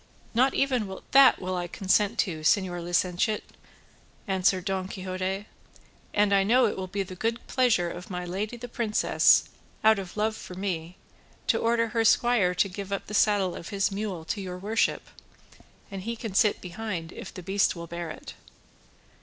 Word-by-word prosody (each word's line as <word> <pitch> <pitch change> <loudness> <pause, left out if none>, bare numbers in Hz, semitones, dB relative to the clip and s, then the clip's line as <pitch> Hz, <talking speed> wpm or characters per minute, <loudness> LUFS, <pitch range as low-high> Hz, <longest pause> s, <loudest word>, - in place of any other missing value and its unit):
"Nor 255 +4 +4
even 240 -9 0
that 270 -1 +7
will 185 0 -3
I 175 -1 -2
consent 200 +5 +1
to, 170 -5 -4
señor 175 +2 +1
licentiate," 180 +4 0 0.8
answered 190 -1 +1
Don 190 -2 -1
Quixote, 190 +1 -4 0.7
"and 205 -1 +2
I 195 - +5
know 245 +5 +4
it 215 - 0
will 190 -1 -4
be 195 +2 -2
the 185 0 -9
good 225 +5 -2
pleasure 235 -9 +2
of 180 - -9
my 180 -1 -4
lady 205 +6 -4
the 245 +1 -7
princess, 230 -3 +3 0.4
out 220 -1 +5
of 190 +1 -8
love 215 +1 0
for 180 - -9
me, 180 -2 -4 0.5
to - - +2
order 230 0 +1
her 230 0 +1
squire 225 -5 +3
to 190 - +2
give 195 +1 -7
up 200 - -2
the 210 - -9
saddle 205 -3 +2
of 170 - -8
his 200 0 0
mule 195 -5 -4
to 200 +5 -3
your 180 -1 -6
worship, 210 +4 0 0.9
and 195 -1 -5
he 230 +4 -4
can 225 -3 -6
sit 210 +1 +3
behind 180 -3 -5
if - - -8
the 185 - -9
beast 195 +2 +1
will 170 0 -7
bear 170 0 -6
it." 155 - -9
195 Hz, 180 wpm, -27 LUFS, 180-220 Hz, 0.9 s, that